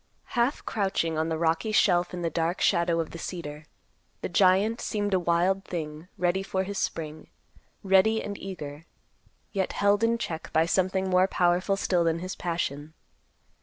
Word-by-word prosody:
Half 245 +3 +1
crouching 190 -6 0
on 160 +1 0
the 160 - -1
rocky 165 +6 +1
shelf 180 -4 +3
in 175 -1 -5
the 165 - -1
dark 165 +3 -1
shadow 170 -2 +2
of 165 - -2
the 170 - -8
cedar, 155 -4 -6 0.6
the - - -3
giant 195 +6 +3
seemed 205 -2 -1
a 185 - +4
wild 180 +3 +1
thing 155 -1 -6
ready 180 +1 +1
for 190 -1 -1
his 200 +1 -4
spring; 155 -1 -4 0.6
ready 195 +3 +4
and 205 - -5
eager, 160 -5 -7 0.6
yet 195 -3 -1
held 205 +2 +2
in 230 +1 +3
check 160 -8 -5
by 160 +1 +3
something 190 +2 +1
more 185 +1 +4
powerful 180 +2 +1
still 180 -3 +1
than 165 -1 +1
his 185 +2 -5
passion. 155 -3 -3
180 Hz, 165 wpm, -27 LUFS, 165-195 Hz, 0.6 s, a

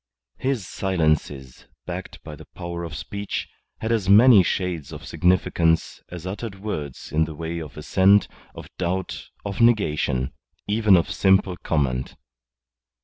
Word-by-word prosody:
His 130 -9 -1
silences, 75 -8 -1 0.2
backed - - -7
by 75 - -8
the - - -14
power 85 0 -5
of 85 -1 -6
speech, 100 0 -4 0.3
had 110 - -1
as 105 -5 0
many 110 +1 +8
shades 90 -4 -2
of - - -9
significance 85 -2 +1
as 90 -1 -8
uttered 95 +1 -6
words 75 -10 -5
in 80 +1 +2
the 80 -1 -8
way 85 +2 -4
of 75 -2 -9
assent, 95 +6 +4 0.3
of - - -9
doubt, 90 +1 -3 0.2
of 100 +4 -3
negation 75 - +2 0.3
even 105 -2 +4
of 85 - 0
simple 95 -1 +3
comment. 70 -7 -1
90 Hz, 140 wpm, -23 LUFS, 80-100 Hz, 0.3 s, many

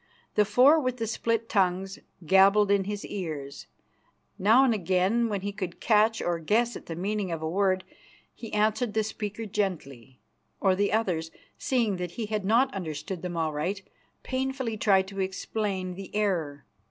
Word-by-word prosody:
The 210 - +3
four 255 +10 +5
with 255 -3 -2
the 230 - -2
split 230 +1 -1
tongues 190 -1 0 0.3
gabbled 195 +3 +5
in 200 -1 +2
his 205 0 -4
ears. 150 -7 -6 0.7
Now 225 +7 +5
and 255 -4 +3
again, 195 +4 +1
when 200 -2 -2
he 200 +1 -3
could 185 -4 -6
catch 220 0 +3
or 175 -1 -1
guess 230 +8 +1
at - - -10
the 165 - -5
meaning 195 +1 -2
of 160 -1 -4
a - - -1
word, 185 +2 +1 0.5
he 225 - -9
answered 215 +2 0
the 220 - +2
speaker 215 0 -5
gently; 150 - -4 0.4
or 190 -2 +3
the 200 +1 +1
others, 180 -7 0 0.3
seeing 230 -7 0
that 180 -1 -5
he 230 - -4
had 210 -1 -2
not 245 +6 +3
understood 170 -1 -5
them 175 -2 -4
aright, 160 +5 -2 0.4
painfully 260 -3 -2
tried 195 -3 +3
to 195 0 -7
explain 190 -1 -3
the 195 +1 -8
error. 170 -9 -1
200 Hz, 165 wpm, -27 LUFS, 180-220 Hz, 0.7 s, four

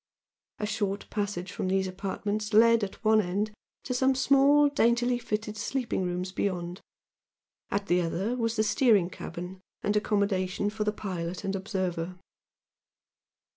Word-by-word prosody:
A 210 - -2
short 205 -1 -2
passage 200 -3 -3
from - - -3
these 190 0 +1
apartments 205 +3 -3
led 230 0 +6
at 200 +3 -6
one 220 0 +5
end 200 +3 -1 0.3
to 255 - -3
some 265 +1 +3
small, 280 +2 +5
daintily 240 -3 +2
fitted 215 -2 -3
sleeping 250 -3 -2
rooms 180 +1 -3
beyond, 180 -2 -2 0.9
at 200 0 -1
the 180 -2 +2
other 185 +8 -1
was 230 -2 -1
the 215 - +2
steering 210 -5 +3
cabin 180 +2 -7 0.2
and 205 - +1
accommodation 200 -2 0
for 210 0 -2
the 210 - +2
pilot 180 -4 -5
and 195 0 -1
observer. 185 -3 -3
205 Hz, 140 wpm, -28 LUFS, 185-225 Hz, 0.9 s, led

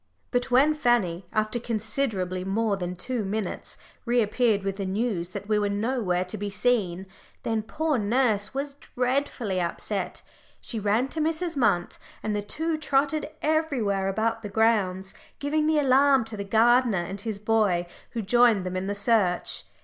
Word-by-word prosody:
But 245 +1 0
when 270 +5 +5
Fanny, 215 - +1
after 215 +2 0
considerably 215 -5 -2
more 205 +2 0
than 180 -1 -4
two 240 +4 -2
minutes, 205 0 -4 0.3
reappeared 235 -3 +2
with 195 0 -2
the 200 - -3
news 195 -3 -1
that 200 - -7
we 215 -1 +2
were 205 -1 0
nowhere 200 -4 0
to 185 +3 -7
be 205 0 -3
seen, 195 -4 0 0.4
then 225 -1 0
poor 300 +5 -1
nurse 215 -1 +1
was 280 +1 -3 0.2
dreadfully 250 -7 0
upset. 180 +2 -3 0.4
She 230 - -5
ran 215 +5 +1
to 315 - -3
Mrs. 325 +2 -1
Munt, 210 -9 +1 0.2
and 215 -1 -1
the 205 - 0
two 315 +10 -2
trotted 295 +1 +1
everywhere 270 -12 +1
about 225 +3 0
the 205 - -6
grounds, 195 -3 +1 0.2
giving 305 +2 0
the 315 0 +3
alarm 275 -2 +4
to 225 -1 -7
the 200 - -4
gardener 230 +2 +4
and 195 +3 -5
his 220 -1 -3
boy, 210 -4 +1 0.3
who 230 -2 -2
joined 230 -2 +4
them 185 0 -3
in 185 +1 -2
the 205 - -2
search. 200 -4 +1
220 Hz, 165 wpm, -26 LUFS, 195-255 Hz, 0.4 s, when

